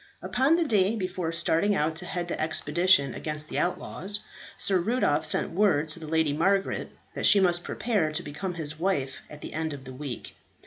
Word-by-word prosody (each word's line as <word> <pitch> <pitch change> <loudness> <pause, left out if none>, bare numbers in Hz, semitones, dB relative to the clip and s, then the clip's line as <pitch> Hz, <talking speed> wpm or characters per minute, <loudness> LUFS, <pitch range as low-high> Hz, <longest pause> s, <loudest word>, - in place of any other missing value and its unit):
Upon 270 +6 +3
the 340 - +2
day 210 -4 +2
before 185 -4 -2
starting 170 +4 +2
out 155 -1 0
to 180 +1 -2
head 175 -1 -2
the - - -3
expedition 155 -2 +2
against 150 0 -3
the - - -1
outlaws, 195 +3 -1 0.4
Sir 190 -2 +2
Rudolph 175 -7 +1
sent - - 0
word 165 -5 +2
to 155 - -4
the 160 - -8
Lady 160 -2 +1
Margaret 195 +6 +1 0.2
that - - +1
she 205 - +7
must 175 -2 +2
prepare 205 -10 0
to 175 +3 -2
become 175 +5 -5
his 155 -2 -5
wife 145 -8 -1
at 150 0 -11
the - - -7
end 160 -1 -2
of 140 -2 -8
the 130 - -8
week. 130 -2 -6
170 Hz, 195 wpm, -27 LUFS, 150-195 Hz, 0.4 s, she